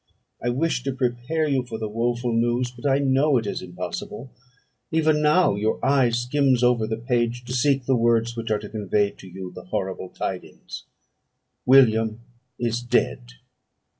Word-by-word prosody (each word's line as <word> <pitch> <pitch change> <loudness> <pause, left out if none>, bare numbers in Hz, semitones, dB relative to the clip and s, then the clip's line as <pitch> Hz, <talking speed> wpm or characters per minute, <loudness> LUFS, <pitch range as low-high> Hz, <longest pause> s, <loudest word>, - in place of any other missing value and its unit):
I 120 - +1
wish 135 +1 0
to 135 +1 -3
prepare 130 +5 -1
you 135 -3 +1
for 120 -3 -7
the 110 -1 -3
woful 120 +2 -1
news, 120 +2 +1
but 125 +3 -3
I 135 - +3
know 140 +1 +3
it 115 - -2
is 100 - -3
impossible; 90 +7 -7 0.6
even 155 -1 +2
now 150 - +4
your 105 +2 0
eye 135 -2 +4
skims 125 +2 +1
over 120 -3 +3
the 110 0 -2
page, 120 0 -1
to 125 - -5
seek 135 0 +2
the 130 - +2
words 115 0 +2
which 115 -1 -5
are 110 - +2
to 105 0 -8
convey 105 -1 0
to 95 - -14
you 95 0 -8
the - - -10
horrible 95 -1 -4
tidings. - - -6 0.8
"William 115 -4 +4 0.4
is 120 0 -1
dead! 120 - +1
120 Hz, 165 wpm, -24 LUFS, 110-135 Hz, 0.8 s, now